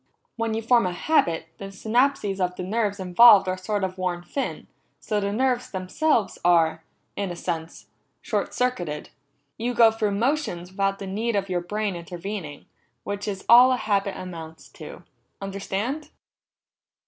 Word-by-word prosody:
When 230 -1 -1
you 225 - -3
form 235 -3 +4
a 180 - -3
habit, 170 - +1
the 195 - -6
synapses 215 +1 0
of 180 -1 0
the 180 - -5
nerves 205 +1 -1
involved 195 +2 +7
are 185 - 0
sort 195 +2 -3
of 185 0 -3
worn 180 -1 -2
thin, 270 +10 -4 0.3
so 210 -2 -1
the 200 0 -1
nerves 255 +2 0
themselves 205 +5 0
are, 165 -2 +3 0.3
in 200 -2 -2
a 175 - -5
sense, 165 -2 -5 0.3
short - - -2
circuited. 175 -12 -2 0.5
You 240 +2 -2
go 230 -1 +7
through 215 -2 -1
motions 225 - -1
without 195 0 0
the 195 - -7
need 215 +4 -2
of 195 -1 -1
your 180 -1 0
brain 205 +2 -2
intervening, 175 -2 -7 0.4
which 205 0 -4
is 195 -2 -4
all 250 +2 +8
a - - 0
habit 200 -3 -1
amounts 165 -3 -9
to. - - -11 0.4
Understand?" 200 +9 -4
200 Hz, 160 wpm, -24 LUFS, 180-230 Hz, 0.5 s, all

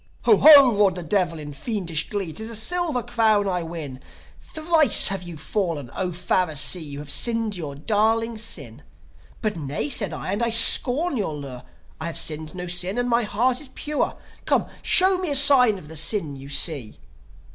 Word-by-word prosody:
"Ho, 430 - +4
ho!" 280 -6 +7
roared 200 -3 +2
the 180 - -6
Devil 175 -1 -1
in 150 -1 -9
fiendish 170 - -3
glee. 195 -6 -4
"'Tis 220 +4 -7
a 230 - -5
silver 310 +2 -1
crown 215 -2 +1
I 180 -2 -2
win! 160 -6 -8 0.4
Thrice 315 -4 +3
have 195 -2 -3
you 175 -2 -9
fallen! 160 - -4
0 190 - -2
Pharisee, 180 -1 -1
You 145 -2 -7
have 145 -1 -8
sinned 225 +4 0
your 150 -6 -7
darling 220 +7 0
sin!" 140 - -6 0.6
"But, 210 -4 -2
nay," 145 -1 -2
said - - -1
I; - - -6
"and 205 +4 -2
I 235 - +1
scorn 255 +7 +4
your 190 -8 -3
lure. 135 -4 -9 0.4
I 160 - -4
have 170 - -5
sinned 155 +1 -4
no 180 0 -6
sin, 180 +4 -2
and 245 0 -1
my 235 0 +2
heart 240 +5 0
is 295 - -8
pure. 300 0 -3 0.3
Come, - - +1 0.2
show 375 0 +3
me 365 -3 -3
a 285 - +1
sign 260 -6 +6
of 155 - -13
the 160 - -10
sin 160 -2 -1
you 135 +1 -11
see!" 140 -5 -1
195 Hz, 190 wpm, -22 LUFS, 155-235 Hz, 0.6 s, ho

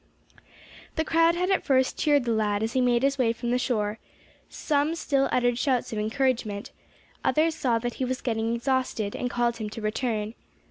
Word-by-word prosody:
The 320 - 0
crowd 330 +1 +3
had 360 +2 0
at 385 - +2
first 260 -2 +2
cheered 290 -4 +2
the 235 - 0
lad 210 -1 +1
as 225 +1 -2
he 260 - +2
made 245 0 +2
his 275 0 +1
way 230 -3 +3
from 235 +1 -3
the 250 - +2
shore; 215 -4 -1 0.5
some 295 +1 0
still 275 -4 +1
uttered 245 -1 +2
shouts 255 -5 0
of 215 - -2
encouragement, 220 -2 -1 0.5
others 320 +1 +2
saw 250 -7 +1
that 240 +1 -3
he - - +2
was 255 +1 -2
getting 225 -1 -1
exhausted, 240 -4 -1
and 250 - -2
called 240 -1 +1
to 225 -2 -6
him - - -4
to 215 - -8
return. 215 0 -2
245 Hz, 195 wpm, -26 LUFS, 225-275 Hz, 0.5 s, crowd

